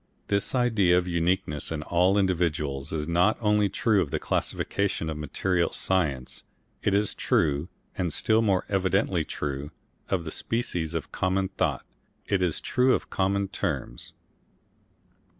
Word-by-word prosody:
This 100 +5 +1
idea 110 -8 +3
of 90 0 0
uniqueness 85 -4 0
in 75 -2 -3
all 90 +5 +3
individuals 75 -7 0
is 75 -1 -2
not 85 +5 +3
only 105 -2 +2
true 105 0 +2
of 75 - -2
the - - -1
classifications 95 -5 -1
of 75 - -5
material 85 +4 0
science; 75 -9 -1 0.4
it 100 - +1
is 105 0 +1
true, 75 +1 +1 0.3
and 90 -3 -1
still 110 +9 +2
more 100 -4 +1
evidently 95 -2 +1
true, 70 -1 -4 0.4
of 95 -3 0
the 80 - -5
species 85 -9 -2
of 80 - -4
common 95 +1 0
thought, 95 - -1 0.4
it 100 -2 0
is 90 -3 +1
true 125 0 +3
of - - -6
common 100 +1 +1
terms. - - -4
90 Hz, 145 wpm, -27 LUFS, 80-100 Hz, 0.4 s, idea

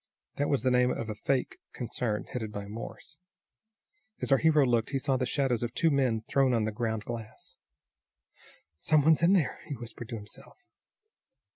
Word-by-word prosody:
That 145 - 0
was 140 - +1
the 130 - +3
name 125 0 +4
of 115 -3 -3
a - - -2
fake 130 +5 -1
concern 115 -3 -2
headed 110 -4 -5
by 100 -1 -5
Morse. 115 +7 -9 1.0
As - - -2
our 135 - +6
hero 155 -3 +4
looked 120 -3 +1
he 135 - -1
saw 135 0 0
the 130 -1 0
shadows 130 -5 0
of 120 0 -3
two 165 - +3
men 125 -6 +1
thrown 135 -3 +3
on 115 - +1
the 110 - -1
ground 110 -1 -2
glass. 115 -2 -8 1.2
"Some 155 -2 +3
one's 160 +1 +5
in 170 +3 +5
there!" 175 -8 +1
he 145 - -4
whispered 120 -1 -9
to 120 - -4
himself. 105 -1 -11
125 Hz, 180 wpm, -29 LUFS, 110-140 Hz, 1.2 s, our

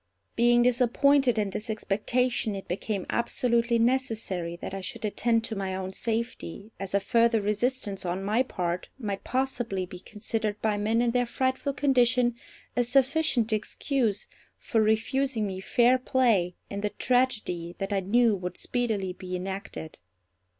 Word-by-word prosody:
Being 240 +1 +5
disappointed 250 +1 +3
in 205 -2 0
this 210 +3 -4
expectation, 220 +2 0
it 195 - -7
became 195 +1 -3
absolutely 235 0 +1
necessary 225 -8 0
that 175 - -7
I 195 - -4
should 190 - -6
attend 230 +2 +1
to 225 -1 -4
my 190 -1 -2
own 190 0 -4
safety, 225 -3 -3
as 195 0 -3
a - - +5
further 230 +3 +3
resistance 210 -1 -1
on 180 +2 -2
my 215 +5 +2
part 180 -8 -3
might 205 -6 -4
possibly 245 -7 -1
be 180 0 -10
considered 215 +1 -3
by 215 -1 +1
men 220 +3 +1
in 240 - +2
their 245 0 +1
frightful 260 +3 -1
condition 250 -3 +3 0.4
a 245 - +3
sufficient 260 -2 +2
excuse 215 0 -1 0.3
for 225 -5 0
refusing 220 +2 +1
me 190 -2 -4
fair 245 +6 +3
play 230 -10 +2
in 200 0 -5
the 210 - 0
tragedy 215 -10 0
that 195 +1 -3
I 195 - +2
knew 220 +3 +3
would 180 -2 -5
speedily 220 -7 -1
be 185 0 -6
enacted. 185 - -6
220 Hz, 150 wpm, -27 LUFS, 195-245 Hz, 0.4 s, Being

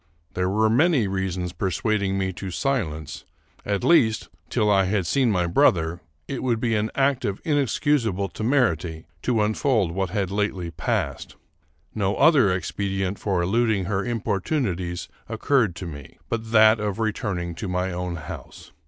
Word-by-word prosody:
There 90 0 0
were 110 +3 +2
many 130 - +3
reasons 95 -2 -2
persuading 95 +2 0
me 95 -1 -1
to 95 +2 -6
silence; 85 - -2 0.4
at 100 -1 -1
least, 115 -10 +3 0.2
till 110 -4 +1
I 100 -2 +4
had 95 -1 0
seen 130 +7 +2
my 90 -4 +1
brother, 85 0 +2 0.3
it 135 - -4
would 120 -3 0
be 115 -1 0
an 105 0 +1
act 135 -1 +2
of 100 -1 -2
inexcusable 140 - +1
temerity 100 - 0 0.2
to 115 -4 +1
unfold 110 - +1
what 95 +1 -2
had 95 -1 -2
lately 100 -4 -1
passed. - - -2 0.6
No 100 -1 0
other 140 - +5
expedient 95 +1 -2
for 95 -4 0
eluding 110 0 +1
her 95 +1 -1
importunities 100 - -2 0.2
occurred 120 -11 +1
to 95 - -6
me 75 -4 -9
but 110 -1 -3
that 110 0 +6
of 105 -1 -2
returning 100 -6 -2
to 90 +5 -5
my 90 +1 -1
own 90 0 -3
house. 75 -3 -9
100 Hz, 155 wpm, -24 LUFS, 90-115 Hz, 0.6 s, that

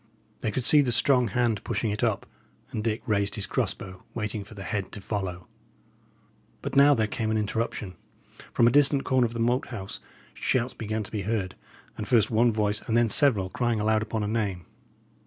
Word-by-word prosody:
They 110 - -1
could 125 +4 -2
see 150 +2 +7
the 130 -4 0
strong 125 +2 +3
hand 115 -1 0
pushing 110 - -1
it 105 +3 -3
up; 110 -4 0 0.5
and 105 - -3
Dick 110 0 -1
raised 100 -2 +1
his 105 - -1
cross - - -1
bow, 95 -1 -10
waiting 105 -2 -3
for 110 +2 -14
the 100 - -7
head 100 -1 -3
to - - -5
follow. 95 -3 -4 1.2
But - - -4
now 140 +1 +7
there 110 -3 +1
came 110 +1 -2
an 110 - +1
interruption. 105 -2 -2 0.6
From 115 - +3
a 120 - +5
distant 140 0 +4
corner 130 -1 +2
of 115 - -4
the 115 - -5
Moat 120 +3 +1
House 100 -6 -7 0.3
shouts 125 0 0
began 110 0 -3
to - - -11
be 105 - -2
heard, 100 -2 -2 0.5
and 105 - -4
first 115 -4 +3
one 115 +2 +4
voice, 105 -1 0
and 115 - +2
then 120 -1 +3
several, 105 -7 +3
crying 120 -1 0
aloud 110 +1 +2
upon 110 0 -2
a - - -1
name. 100 -6 -2
110 Hz, 205 wpm, -27 LUFS, 105-120 Hz, 1.2 s, see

